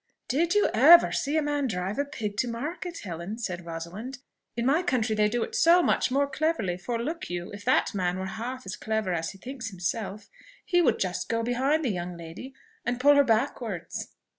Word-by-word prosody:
"Did 335 +8 +1
you 415 - +4
ever 315 +9 +8
see 290 +3 0
a 310 - +2
man 290 -2 0
drive 190 +2 -3
a 285 - +1
pig 220 -8 -5
to 245 - +1
market, 310 +9 -5
Helen?" 175 +3 -5
said 180 -7 -5
Rosalind. 175 +10 -6 0.4
"In 235 - 0
my 285 +6 +3
country 250 -10 0
they 210 0 +3
do 240 +2 0
it - - -7
so 345 +2 +5
much - - +2
more 275 +2 +2
cleverly! 280 - 0
for 230 +6 -3
look 315 +8 -4
you, 175 0 -4
if 205 0 -9
that - - +2
man 180 -2 0
were 190 - -3
half 235 +6 -5
as - - -5
clever 220 -4 -1
as 165 -1 -2
he 195 - -10
thinks 245 +2 -6
himself, 200 +2 -4 0.4
he 350 -1 +3
would - - +3
just 180 -1 -2
go 230 0 0
behind 270 +6 +1
the - - +1
young 175 -1 -4
lady 170 +11 -9 0.3
and 240 0 -2
pull 290 +3 +6
her 285 0 +6
backwards." 225 -7 -2
230 Hz, 210 wpm, -27 LUFS, 190-280 Hz, 0.4 s, ever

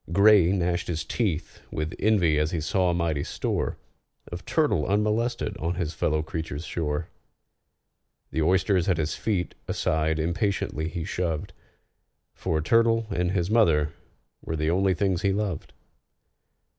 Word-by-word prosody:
GRAY 100 -1 +6
gnashed 90 -2 0
his 80 -2 -2
teeth 95 -9 -2
with 75 +1 -3
envy 90 -8 +3
as 75 0 +1
he 85 - -2
saw 90 +4 +1
a - - +1
mighty 80 -4 0
store - - -2 0.5
Of 85 +1 -7
turtle 125 - +1
unmolested 105 +2 0
on 85 +3 -1
his 85 -2 -2
fellow 75 0 0
creature's 80 -1 -5
shore. 75 -1 -2 1.2
The 80 - -1
oysters 95 +2 +2
at 90 - +2
his 80 -1 -1
feet 95 -5 -1
aside 80 0 0
impatiently 85 -1 -1
he 85 0 -4
shoved, 85 -4 -2 0.8
For 80 -1 -1
turtle 115 +3 +3
and 90 +1 0
his 90 0 0
mother 80 -10 +3 0.5
were 80 - -3
the 80 +1 0
only 95 +1 +2
things 95 -1 0
he 100 - +2
loved. 100 -5 -3
85 Hz, 145 wpm, -26 LUFS, 80-100 Hz, 1.2 s, GRAY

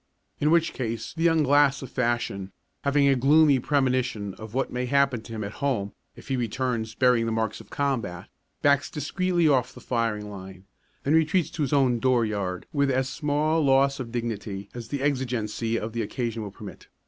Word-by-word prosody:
In 150 - +2
which 165 0 +3
case 115 -3 -4
the 165 - -6
young 165 -2 +4
glass 145 0 +3
of 130 - -9
fashion, 120 -6 -1 0.3
having 140 0 +3
a 135 - +5
gloomy 140 +2 +5
premonition 125 -7 0
of 110 +3 -10
what 135 - -1
may 125 0 -2
happen 140 -3 +2
to 115 - -12
him 110 -1 -4
at 100 - -5
home 115 -8 -1 0.2
if - - -14
he 135 - +1
returns 120 -2 -2
bearing 125 -2 +3
the - - -1
marks 110 -1 -2
of - - -17
combat, 125 -11 -2 0.4
backs 140 -1 +3
discreetly 175 +3 0
off 130 -5 +2
the - - -10
firing 115 -4 -1
line, 95 -2 -10 0.4
and 140 - +2
retreats 160 +1 +2
to 170 - -5
his 140 - 0
own 130 -4 +3
dooryard 110 -7 0
with 140 -2 +2
as 130 0 +1
small 155 +1 0
loss 140 0 +3
of 120 -3 -5
dignity 110 -4 -4
as 120 -2 -7
the 140 +1 -3
exigency 120 -5 -1
of 110 0 -4
the 115 - -1
occasion 115 +1 -3
will 105 - -5
permit. 100 0 -11
125 Hz, 190 wpm, -26 LUFS, 110-140 Hz, 0.4 s, a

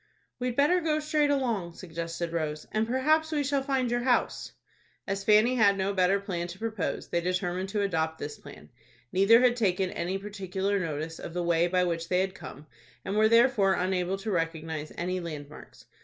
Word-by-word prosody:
"We'd 250 -1 -2
better 325 +7 +3
go 310 -2 +1
straight 300 -1 +1
along," 230 -12 -1
suggested 170 -1 -5
Rose, 155 -2 -3
"and 220 +1 0
perhaps 310 +6 +2
we 295 -2 0
shall 280 0 0
find 265 -3 0
your 240 - +1
house." 245 0 0 0.5
As 195 0 -3
Fanny 215 +4 +5
had 200 -3 +4
no 195 +1 0
better 190 +1 +3
plan 180 -4 -4
to 175 +1 -9
propose, 220 -3 -3
they 170 - 0
determined 180 +1 -2
to 205 0 -1
adopt 160 -4 -1
this 145 -1 -7
plan. - - -13 0.4
Neither 200 +5 +5
had 250 -1 +4
taken 190 -5 0
any 185 +3 -2
particular 195 0 -2
notice 160 -1 -4
of 170 - -8
the 175 - -1
way 170 0 +2
by 180 +1 +2
which 165 -1 -2
they 180 0 +2
had 190 0 -2
come, 145 -2 -10 0.4
and 195 - -2
were 215 +1 +4
therefore 230 -4 +4
unable 185 +1 -1
to 210 +2 -4
recognize 160 -3 -3
any 185 +2 -2
land 155 -4 -6
marks. - - -14
190 Hz, 190 wpm, -28 LUFS, 170-230 Hz, 0.5 s, Fanny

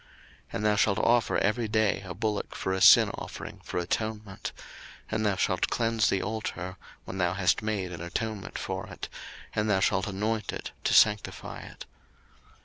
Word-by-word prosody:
02:029:036 - - -26 0.5
And 105 - -1
thou 105 -1 +4
shalt 100 0 +3
offer 120 +1 +3
every 110 +3 +1
day 110 -1 +2
a 90 -3 -7
bullock 105 +1 -2
for 95 - -1
a 95 - -2
sin 95 - +8
offering - - -7
for - - -5
atonement: 105 +2 -3 0.6
and 110 0 0
thou 105 -2 +2
shalt 95 -1 +1
cleanse 115 -3 +2
the 95 - +1
altar, 95 -4 -4 0.3
when 95 - -6
thou 90 -1 +2
hast 90 -1 +2
made 105 -4 -2
an 85 - -7
atonement 100 +3 -4
for 95 0 -4
it, - - -7 0.4
and 105 0 0
thou 95 -2 +3
shalt 95 0 +2
anoint 105 +3 -1
it, - - -6
to - - +3
sanctify 105 -1 +3
it. - - -10
105 Hz, 175 wpm, -28 LUFS, 95-110 Hz, 0.6 s, sin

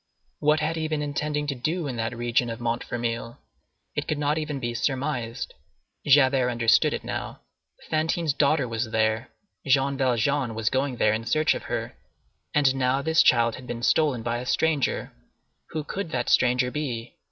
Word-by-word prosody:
What 150 +1 +3
had 160 +2 -1
he 160 0 -1
been 155 -1 -1
intending 150 0 -2
to 145 - -1
do 155 +7 -2
in 130 -3 -3
that 115 +1 -2
region 120 0 +1
of 115 - -5
Montfermeil? 115 0 -3 0.6
It - - -3
could 155 - -1
not 150 +1 0
even 150 -2 -3
be 120 -2 -3
surmised. 130 -2 -2 0.5
Javert 135 -2 +5
understood 115 -2 +3
it - - -3
now. - - -5 0.5
Fantine's 160 0 +1
daughter 140 -1 +2
was 115 0 -2
there. 110 +2 0 0.4
Jean 135 +1 +3
Valjean 130 -1 +1
was 110 0 0
going 130 0 0
there 105 - +3
in 110 +1 -3
search 155 +3 +3
of - - -6
her. - - -3 0.6
And 140 -3 +3
now 135 +1 +1
this 160 +2 +4
child 115 -2 +4
had 125 - -11
been 120 0 -5
stolen 140 -6 +2
by 120 0 -1
a 125 - -6
stranger! 155 -2 0 0.6
Who 155 - -3
could 190 +3 -4
that 125 -6 -2
stranger 125 0 +3
be? 125 -6 -4
130 Hz, 175 wpm, -25 LUFS, 120-150 Hz, 0.6 s, Javert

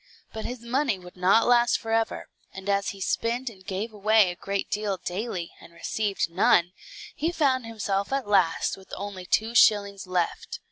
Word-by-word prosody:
But 220 - -6
his 250 -1 -5
money 250 -2 0
would 180 -1 -13
not 185 +5 +4
last 240 -1 +4
forever; 225 0 -1 0.3
and 190 +1 -9
as 200 -1 +1
he 200 - -8
spent 235 +5 -1
and 190 -3 -17
gave 200 +4 -4
away 210 -2 +4
a - - -8
great 195 +2 -3
deal 205 -2 -1
daily, 185 -1 -4
and - - -14
received 200 +3 -1
none, 175 0 +3 0.4
he 325 +3 -1
found 265 -7 +1
himself 200 -2 -2
at 275 -4 -1
last 185 -5 +2
with 190 - -17
only 195 -3 -6
two 220 +5 +1
shillings 200 -4 +4
left. 180 -2 -2
205 Hz, 175 wpm, -26 LUFS, 190-230 Hz, 0.4 s, not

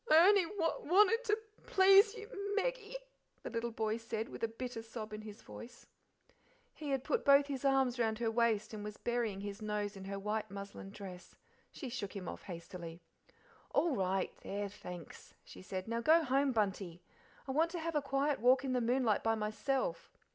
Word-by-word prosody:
"I 310 - +8
only 400 -3 +6
w 330 -4 -2
wanted 420 +5 +6
to 420 -2 +3
p 440 - -13 0.2
p - - -24
please 390 +2 +7
you, 440 - -7
M - - -12
M 405 0 -3
Meggie," - - -1 0.5
the - - -5
little 235 0 -1
boy 220 -1 -1
said, 230 0 -4
with - - -8
a - - +3
bitter 230 +1 -5
sob 220 -1 -7
in 215 - -5
his 215 0 -10
voice. 235 0 -11 0.9
He 300 -2 -6
had 270 -2 0
put 485 - 0
both 280 0 +7
his 275 -2 -4
arms 265 -2 +3
round 220 -2 +1
her 230 -1 0
waist, 225 -2 +1
and 210 -1 -5
was 210 0 -6
burying 235 -5 -1
his 205 +1 -6
nose 210 -1 -2
in 190 -1 -8
her 200 0 -4
white 210 +2 -2
muslin 200 -1 -8
dress. 195 -3 -10 0.4
She 270 - -7
shook 230 -5 -5
him 185 -3 -5
off - - -6
hastily. 170 -1 -8 0.8
"All 330 -5 +3
right; 190 -2 0
there 200 0 -3
thanks," 180 -4 -10
she 90 - -12
said. 185 - -5
"Now 230 +1 -1
go 320 +6 +5
home, 275 0 +2
Bunty; 195 -6 -1 0.4
I - - -2
want 320 +5 +3
to 345 0 -4
have 330 +1 -3
a 295 - +3
quiet 275 +1 0
walk 255 +3 +4
in 260 - 0
the 250 - +2
moonlight 240 -2 +2
by 225 0 +2
myself." 215 -4 -2
230 Hz, 205 wpm, -35 LUFS, 205-280 Hz, 0.9 s, I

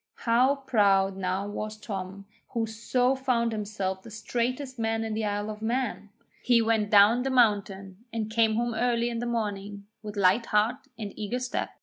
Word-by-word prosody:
How 250 +4 +4
proud 200 -8 +2
now 190 +1 -2
was 215 +1 -5
Tom, 195 -2 -6 0.3
who 230 -1 0
so 240 +4 0
found 250 -3 0
himself 200 -3 -3
the 230 - -12
straightest 250 +4 -3
man 225 0 0
in 220 -1 -3
the 220 +1 -2
Isle 205 +1 -2
of 210 0 -9
Mann! 230 -2 -2 0.3
He 240 -2 +4
went 220 -2 +1
down 210 +4 +6
the 270 - -1
mountain 200 -5 +1
and 225 -2 -2
came 225 -1 +3
home 235 +1 0
early 235 +1 +1
in 230 - -3
the 240 - -3
morning 205 -3 -3 0.2
with 210 -1 -8
light 200 +4 +3
heart 230 +6 +1
and 210 -3 -6
eager 215 +3 -3
step. 250 0 -3
220 Hz, 180 wpm, -27 LUFS, 205-235 Hz, 0.3 s, down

